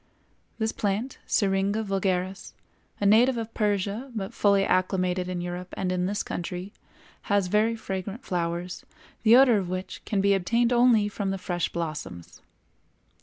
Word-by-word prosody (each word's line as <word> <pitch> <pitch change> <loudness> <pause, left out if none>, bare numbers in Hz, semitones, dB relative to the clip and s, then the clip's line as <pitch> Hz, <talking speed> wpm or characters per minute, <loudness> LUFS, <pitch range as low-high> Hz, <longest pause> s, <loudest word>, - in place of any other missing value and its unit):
This 220 -1 0
plant, 210 +6 -2
Syringa 200 +1 +1
vulgaris, 190 -1 -2 0.5
a 205 - -1
native 235 +5 +5
of 225 0 -5
Persia 210 +4 -1
but 195 -3 -4
fully 200 -1 +3
acclimated 185 -1 0
in 180 -1 -3
Europe 180 +1 -6
and 185 -1 -1
in 180 0 0
this 205 +1 -2
country, 180 +3 -5 0.6
has 200 -2 +3
very 215 +3 +2
fragrant 200 +1 -5
flowers, 175 0 -3 0.4
the 225 +1 +6
odor 250 -5 +6
of 185 -3 -4
which 185 +1 -5
can 205 - -1
be 200 +1 +4
obtained 230 +6 +2
only 240 -4 +4
from 205 -1 -3
the 195 - -1
fresh 175 -2 -2
blossoms. 155 - -6
195 Hz, 150 wpm, -26 LUFS, 180-215 Hz, 0.6 s, the